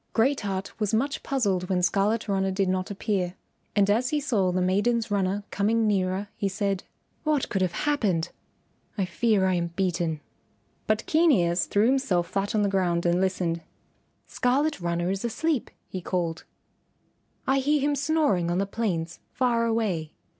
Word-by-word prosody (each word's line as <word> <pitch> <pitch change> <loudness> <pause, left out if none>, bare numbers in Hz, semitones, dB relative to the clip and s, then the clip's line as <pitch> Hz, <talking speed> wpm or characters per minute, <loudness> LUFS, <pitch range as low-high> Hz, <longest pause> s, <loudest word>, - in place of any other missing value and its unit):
Great 265 +5 +2
Heart 195 -1 -4
was 210 0 +1
much 275 +5 0
puzzled 195 -9 0
when 180 -1 +1
Scarlet 205 +5 +1
Runner 195 -1 +1
did 190 0 0
not 185 0 -1
appear, 195 -3 -2 0.4
and 200 -2 +4
as 230 +5 +2
he 300 - +1
saw 220 -11 +1
the 180 - 0
maiden's 210 +5 +1
runner 200 0 0
coming 220 +3 +1
nearer, 195 -1 0
he 200 - -1
said, 195 -1 -1 0.4
"What 305 -3 +1
can 195 - -1
have 185 -2 +1
happened? 200 - 0 0.7
I 195 - +1
fear 200 +2 +2
I 185 - +2
am 170 -1 0
beaten." 170 -4 0 0.7
But 215 +1 +1
Keen 325 +1 +4
Ears 175 -6 +2
threw 205 +2 +2
himself 245 -9 +2
flat 200 +2 -1
on 210 - +3
the - - +3
ground 180 -3 +1
and 175 +1 +2
listened. 180 -3 0 0.6
"Scarlet 275 0 0
Runner 175 +1 -1
is 195 +2 -3
asleep," 275 +4 -1 0.2
he 185 - -5
called; 170 -2 -2 1.0
"I 270 +1 +3
hear 290 +2 +2
him 290 +1 +1
snoring 285 - +1
on 175 - 0
the 195 - +1
plains 185 -6 -2
far 240 -2 +1
away." 200 -9 -1
200 Hz, 170 wpm, -26 LUFS, 180-235 Hz, 1.0 s, and